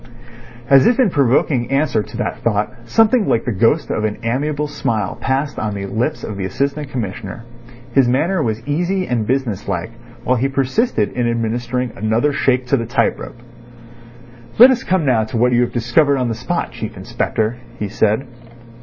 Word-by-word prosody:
As 135 0 +6
if 245 - +2
in 240 -8 +4
provoking 130 -2 +2
answer 135 -4 +1
to - - -9
that - - -3
thought, 105 -1 0
something 225 - +3
like 115 - +1
the 125 - 0
ghost 115 - +1
of 105 - -1
an 105 -1 -1
amiable 145 +5 -1
smile 110 -8 -2
passed 135 +2 -2
on 105 -1 -2
the 100 -1 -4
lips 120 +10 -2
of 105 - -5
the 95 - -3
Assistant 140 +7 -2
Commissioner. 110 -3 -5 0.5
His 135 -1 +4
manner 160 +9 +1
was 115 -1 -3
easy 180 +5 0
and 115 -4 -1
business 120 -6 -1
like 90 +1 -3 0.3
while 130 +1 +1
he 130 +4 +1
persisted 135 - 0
in 120 -1 -1
administering 120 +2 -2
another 110 +8 +1
shake 130 -2 +1
to 140 - +2
the 115 -2 -3
tight 120 -1 +1
rope. 120 - -9 1.2
"Let 250 +4 +9
us 250 -2 -1
come 185 -4 +1
now 120 -5 +3
to 110 - -4
what 125 +2 +3
you 120 0 +3
have 120 - 0
discovered 130 +5 +2
on 125 -2 0
the - - -1
spot, 125 +10 -3
Chief 115 -3 -7
Inspector," 110 +2 -2 0.2
he 105 - -3
said. 110 +5 +1
125 Hz, 185 wpm, -18 LUFS, 110-140 Hz, 1.2 s, Let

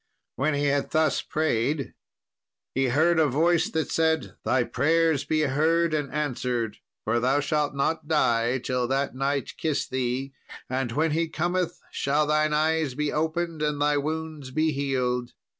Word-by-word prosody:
When 145 +2 0
he 145 0 0
had 140 0 +1
thus 155 0 +2
prayed, 145 -1 -1 0.8
he 135 0 +1
heard 160 +6 +3
a 155 - +4
voice 160 +5 +2
that 160 -1 -2
said, 160 -1 +1
'Thy 130 -2 +2
prayers 160 +4 +1
be 155 -1 +1
heard 160 +4 +2
and 145 -3 -1
answered, 125 -6 -2 0.3
for 115 +2 +1
thou 130 +4 +2
shalt 145 0 0
not 155 +3 -1
die 120 -5 +2
till 125 -1 -1
that 135 +2 0
knight 135 +1 -2
kiss 155 -3 -1
thee; 130 +1 -2 0.3
and 130 -1 -2
when 155 +4 +1
he 165 +2 +1
cometh 175 +2 -1
shall 145 +2 +1
thine 155 0 +2
eyes 155 -2 +1
be 150 +1 -1
opened 160 +1 -1
and 150 -1 0
thy 145 0 +2
wounds 155 -1 -3
be 155 +4 +1
healed.' 125 -3 -1
145 Hz, 160 wpm, -26 LUFS, 130-160 Hz, 0.8 s, a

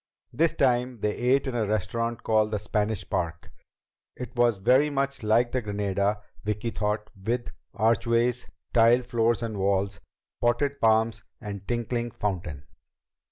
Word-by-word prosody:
This 165 +1 +2
time 125 -3 +1
they 105 0 0
ate 130 +3 +2
in 130 - -3
a 115 -3 0
restaurant 115 +3 -2
called 110 -1 +2
the 105 - -1
Spanish 105 0 -2
Park. 85 -1 -3 0.6
It 125 0 -8
was 120 -3 +3
very 130 +9 +4
much 140 -1 -2
like 115 +3 +2
the 130 - 0
Granada, 100 0 -1 0.2
Vicki 105 +2 -2
thought, 105 0 -2
with 115 +5 -3 0.2
archways, 115 +2 +1 0.3
tiled 120 +2 +5
floors 120 -1 +1
and 110 -3 -4
walls, 95 -1 0 0.4
potted 120 +4 +1
palms 110 -1 +3 0.2
and 100 -3 -7
tinkling 120 0 -1
fountain. 90 -10 -4
115 Hz, 140 wpm, -27 LUFS, 105-120 Hz, 0.6 s, tiled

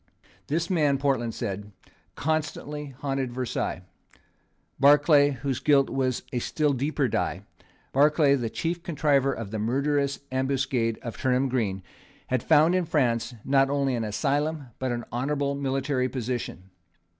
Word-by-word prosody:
This 165 +3 0
man, 150 -7 +2
Portland 130 -5 0
said, 105 -2 -4 0.4
constantly 150 -1 -2
haunted 135 -3 -2
Versailles. 125 -1 -3 1.0
Barclay, 145 +1 +6
whose 135 -1 -3
guilt 140 -2 +3
was 130 -2 0
of - - -31
a 125 - 0
still 150 +4 0
deeper 140 +1 0
dye, - - -2 0.5
Barclay, 145 +1 +4
the 120 -5 0
chief 170 +7 -3
contriver 145 -5 +2
of 115 -6 -6
the 110 - -3
murderous 140 +5 0
ambuscade 130 -3 0
of 115 - -6
Turnham 130 +1 +1
Green, 100 -7 -1 0.5
had 130 -2 +1
found 155 +8 +4
in 185 -1 +1
France, 125 -6 0
not 135 0 +3
only 140 -2 +1
an 115 -2 -1
asylum, 145 +5 -1
but 130 -1 -1
an 120 -1 -3
honourable 140 +3 -1
military 135 -1 -1
position. 120 -7 -4
135 Hz, 140 wpm, -26 LUFS, 125-145 Hz, 1.0 s, Barclay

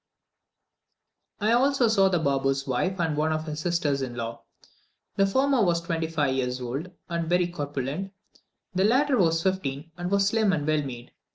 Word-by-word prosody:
I 215 +2 +1
also 260 +1 +3
saw 195 -3 +4
the 180 - +2
Baboo's 135 -3 0
wife 180 +9 -1
and 165 -3 0
one 155 +1 +1
of 155 0 -2
his 150 -1 -5
sisters 155 -4 0
in 125 -2 -4
law. 115 -1 -5 0.7
The 195 - +3
former 265 +3 +2
was 170 -3 +2
twenty 165 -1 -2
five 150 -4 0
years 125 -1 -1
old 130 +8 -4 0.2
and 170 -1 -2
very 180 0 +3
corpulent, 145 +2 -4 0.6
the 185 +1 +2
latter 260 +5 +3
was 165 -2 +2
fifteen 160 -5 -2
and 175 0 -2
was 200 0 +3
slim 210 -1 +2
and 150 -3 -1
well 155 0 +2
made. 125 -3 -8
165 Hz, 175 wpm, -26 LUFS, 140-195 Hz, 0.7 s, saw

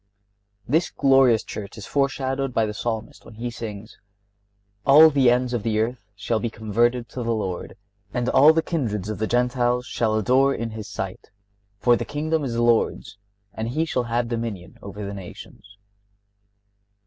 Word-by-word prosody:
This 160 +8 +2
glorious 135 -4 +4
Church 100 +1 -8
is 105 - -8
foreshadowed 135 -2 -1
by 115 - +3
the 105 - -4
Psalmist, 110 0 -4
when 110 - -14
he 120 +2 -4
sings: 110 -2 -8 0.8
"All 155 +3 +8
the 135 -4 +4
ends 125 +1 +1
of 120 - -1
the 110 0 0
earth 115 -1 -2
shall 110 +3 -1
be 120 - -2
converted 115 +3 0
to 125 - -6
the 115 0 -1
Lord, 95 -5 -4 0.3
and 120 +1 -2
all 150 +3 +7
the 160 0 +1
kindreds 110 - -2
of 105 -3 -4
the 110 - 0
Gentiles 125 0 +1
shall 110 -3 0
adore 130 +5 +3
in 115 0 -4
His 110 -1 -7
sight; 95 -1 -6 0.5
for 120 +4 +4
the - - -2
kingdom 155 +1 -2
is 130 -4 -3
the 120 - +1
Lord's, 115 -3 +1 0.3
and 110 0 -4
He 155 +6 0
shall 125 -6 -1
have 120 +1 -1
dominion 115 -6 -5
over 100 +1 -7
the 100 - -5
nations." 100 +1 -11
120 Hz, 170 wpm, -23 LUFS, 110-130 Hz, 0.8 s, All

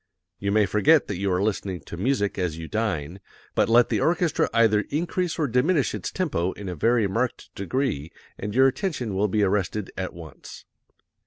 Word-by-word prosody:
You 100 0 -1
may 105 0 +4
forget 105 - +4
that 100 - -4
you 100 -1 0
are 90 +2 +1
listening 95 -4 -2
to 70 - -9
music 100 0 0
as 85 -4 -1
you 80 -1 -6
dine, 95 -6 -2 0.3
but - - +2
let 120 +1 +5
the - - +1
orchestra 170 0 +1
either 110 -2 +3
increase 175 +3 -1
or 155 - +1
diminish 130 +4 +2
its 105 -4 -4
tempo 95 - -1
in 100 - -8
a 90 - -3
very 115 +6 +2
marked 115 +6 -2
degree 100 - -2 0.2
and 105 +2 -5
your 130 +1 +6
attention 135 - -2
will 100 +2 +1
be 105 +1 +1
arrested 100 +1 -1
at 95 -2 -4
once. 80 -2 -11
105 Hz, 185 wpm, -25 LUFS, 95-130 Hz, 0.3 s, your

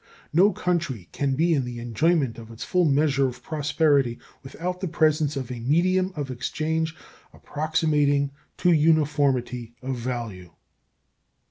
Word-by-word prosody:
No 190 +6 +5
country 170 - -2
can 140 -2 -1
be 165 +4 +2
in 140 -4 +1
the 125 -1 -6
enjoyment 120 +3 0
of 115 -1 -11
its 115 -1 -8
full 180 -1 +2
measure 140 -2 +3
of 125 -1 -8
prosperity 145 -4 +1 0.2
without 180 +7 -5
the 190 - -1
presence 155 -3 +2
of 130 -2 -4
a 125 - -5
medium 185 +9 +2
of 145 -3 -4
exchange 160 +5 -2 0.4
approximating 150 -2 0 0.3
to 180 - +3
uniformity 145 -7 +1
of 130 0 -2
value. 115 -7 -5
145 Hz, 135 wpm, -25 LUFS, 125-160 Hz, 0.4 s, No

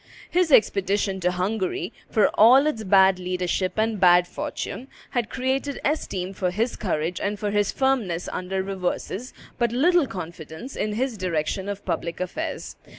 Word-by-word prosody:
His 355 -2 +2
expedition 195 -3 +3
to 180 -1 +1
Hungary, 185 0 -2 0.2
for 215 -3 +3
all 250 +6 +6
its 265 -8 -1
bad 190 -1 +5
leadership 180 0 -1
and 220 -1 +1
bad 175 -1 +6
fortune, 230 +7 -5 0.2
had 240 -3 -1
created 265 +2 -2
esteem 195 - -1
for 185 -1 -1
his 225 +7 -1
courage 170 -2 -2
and 205 +1 -1
for 205 0 -2
his 205 -1 +1
firmness 230 -11 0
under 190 +1 -2
reverses, 195 +4 -3 0.3
but 235 -2 +2
little 320 +5 +3
confidence 170 - -8
in 210 0 -2
his 240 -1 -2
direction 185 +2 -1
of 200 0 -6
public 170 0 -3
affairs. 300 - -4
200 Hz, 150 wpm, -24 LUFS, 180-240 Hz, 0.3 s, all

